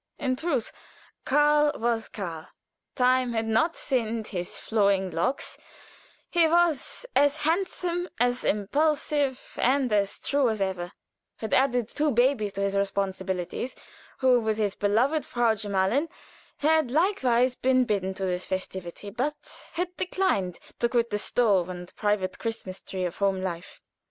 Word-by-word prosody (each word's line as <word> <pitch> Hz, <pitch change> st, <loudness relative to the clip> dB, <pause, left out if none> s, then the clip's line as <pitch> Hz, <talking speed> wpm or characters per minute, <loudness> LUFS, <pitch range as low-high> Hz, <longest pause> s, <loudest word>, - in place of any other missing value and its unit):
In 260 Hz, -3 st, 0 dB
truth, 280 Hz, -5 st, -1 dB, 0.5 s
Karl 295 Hz, +1 st, +4 dB
was 230 Hz, -1 st, -1 dB
Karl. 170 Hz, -6 st, -6 dB, 0.5 s
"Time 255 Hz, -1 st, +3 dB
had 225 Hz, -1 st, 0 dB
not 225 Hz, +10 st, +1 dB
thinned 230 Hz, -4 st, -2 dB
his 175 Hz, -3 st, -4 dB
flowing 200 Hz, -4 st, +1 dB
locks;" 170 Hz, +12 st, -2 dB, 0.7 s
he 340 Hz, -2 st, +4 dB
was 340 Hz, -, +1 dB
as 285 Hz, +1 st, +4 dB
handsome, 355 Hz, +1 st, -1 dB
as 245 Hz, +1 st, +1 dB
impulsive, 280 Hz, +4 st, 0 dB
and 255 Hz, -2 st, +2 dB
as 200 Hz, -1 st, +1 dB
true 280 Hz, -3 st, +1 dB
as 220 Hz, -1 st, -2 dB
ever; 185 Hz, -2 st, -2 dB, 0.5 s
had 220 Hz, -, -4 dB
added 250 Hz, -4 st, +3 dB
two 295 Hz, +5 st, 0 dB
babies 240 Hz, -5 st, +2 dB
to 195 Hz, -, -3 dB
his 200 Hz, 0 st, 0 dB
responsibilities, 195 Hz, +2 st, -2 dB, 0.4 s
who, 255 Hz, -2 st, +4 dB
with 220 Hz, -2 st, -1 dB
his 205 Hz, -3 st, 0 dB
beloved 245 Hz, +11 st, +1 dB
Frau 240 Hz, -3 st, +1 dB
Gemahlin, 205 Hz, +8 st, 0 dB, 0.5 s
had 310 Hz, -2 st, +3 dB
likewise 260 Hz, -, +2 dB
been 255 Hz, 0 st, +2 dB
bidden 190 Hz, -3 st, -1 dB
to 190 Hz, -, -3 dB
this 180 Hz, -1 st, -2 dB
festivity, 190 Hz, +1 st, -5 dB
but 275 Hz, +7 st, -5 dB
had 360 Hz, +1 st, -3 dB
declined 275 Hz, -, 0 dB, 0.2 s
to 235 Hz, -, +2 dB
quit 235 Hz, -1 st, +1 dB
the 210 Hz, -, 0 dB
stove 200 Hz, -7 st, +2 dB
and 180 Hz, -1 st, -8 dB
private 205 Hz, -3 st, -1 dB
Christmas 225 Hz, -5 st, -4 dB
tree 185 Hz, -1 st, -4 dB
of 175 Hz, -, -4 dB
home 195 Hz, -1 st, +1 dB
life. 180 Hz, 0 st, -5 dB
230 Hz, 140 wpm, -27 LUFS, 195-280 Hz, 0.7 s, Karl